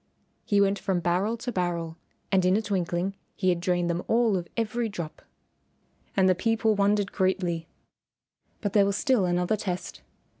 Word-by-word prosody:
He 205 - +2
went 200 0 +3
from 190 -3 0
barrel 185 +7 0
to 245 +2 -4
barrel 170 -4 -2 0.4
and 190 -2 +4
in 185 +2 +4
a - - +1
twinkling 185 -2 -1 0.2
he 185 - +1
had 175 -1 +2
drained 175 0 0
them 170 +1 -1
all 230 -2 +3
of 175 -2 -3
every 230 +1 -1
drop. 170 -6 -6 1.0
And 190 -1 +5
the 185 - +5
people 220 +3 +1
wondered 205 0 +2
greatly. 180 -3 0 0.9
But 205 -3 -2
there 200 -2 +5
was 200 0 0
still 250 -6 +2
another 180 +3 +1
test. 185 -4 -5
190 Hz, 165 wpm, -27 LUFS, 175-210 Hz, 1.0 s, And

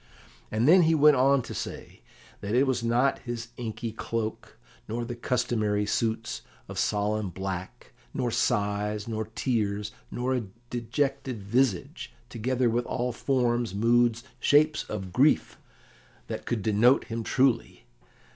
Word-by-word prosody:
And 110 +4 +1
then 180 +4 +8
he 165 -1 +4
went 150 -1 +6
on 135 0 +4
to - - -7
say - - -7 0.4
that 100 +3 -2
it 130 +3 +5
was 125 -3 0
not 120 +4 +2
his 120 -2 -6
inky 115 -1 -4
cloak, 110 0 -4 0.3
nor 120 +2 -3
the 120 - -4
customary 110 -4 0
suits 110 - -1 0.3
of - - -5
solemn 105 0 0
black, 95 0 -6 0.2
nor 120 - -1
sighs, 105 0 0
nor 110 -1 -2
tears, 105 -5 -1 0.2
nor 125 +2 -1
a 125 -4 -1 0.3
dejected 130 -1 -2
visage, 110 -2 0 0.2
together 125 +2 0
with 120 +1 0
all 125 0 -1
forms, 120 -4 0
moods, 120 +2 +3 0.2
shapes 155 +4 +3
of 95 -4 -6
grief, 140 +8 +3 0.7
that - - -6
could 115 -4 -1
denote 110 +5 +4
him 115 -1 -4
truly. 125 - +1
115 Hz, 135 wpm, -27 LUFS, 105-125 Hz, 0.7 s, then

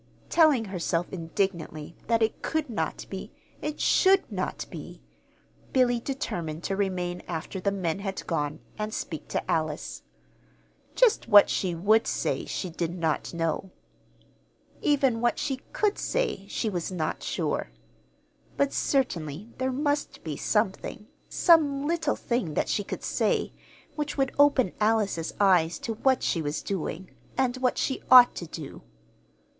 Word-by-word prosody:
Telling 305 -9 +5
herself 175 -2 -2
indignantly 170 -3 -3
that 230 -1 +3
it 220 - -1
could 310 -5 -2
not 220 - -3
be, - - -6 0.3
it 300 0 -4
should 385 0 +4
not - - -3
be, - - -9 0.7
Billy 245 -2 +3
determined 170 - -4
to 195 - -1
remain 180 -3 -2
after 170 +3 -4
the 200 +2 0
men 185 -3 -2
had 195 -1 -4
gone, 150 -2 -2 0.2
and 215 0 -3
speak 160 -3 -5
to - - -2
Alice. 155 -1 -2 0.9
Just - - +3
what 205 -2 +8
she 180 -3 0
would 215 +6 +3
say - - -1
she 185 - -3
did 170 0 -3
not 160 -3 -1
know. 165 +2 -2 1.1
Even 270 -6 +2
what 240 0 +2
she 275 -3 -1
could 420 -1 +1
say, 485 - -1
she 225 - -2
was 180 -3 -2
not 165 -4 -2
sure. - - -2 0.9
But 280 0 +1
certainly 190 - -1
there 260 0 0
must 290 +2 -1
be - - -4
something, - - -1 0.2
some 290 -5 +4
little 320 -2 0
thing 235 -11 -2
that - - 0
she 205 - 0
could - - -6
say, - - 0 0.4
which 295 -1 -3
would 270 -1 +1
open 280 -8 +5
Alice's 210 -6 +1
eyes 180 -5 +4
to 230 - -4
what 260 +4 +2
she 165 - +1
was 150 0 -3
doing, 185 -1 -4 0.3
and 260 -1 +1
what 255 -1 +1
she 265 - -1
ought 250 -1 +9
to 170 - -5
do. 155 -3 -8
205 Hz, 145 wpm, -27 LUFS, 170-265 Hz, 1.1 s, ought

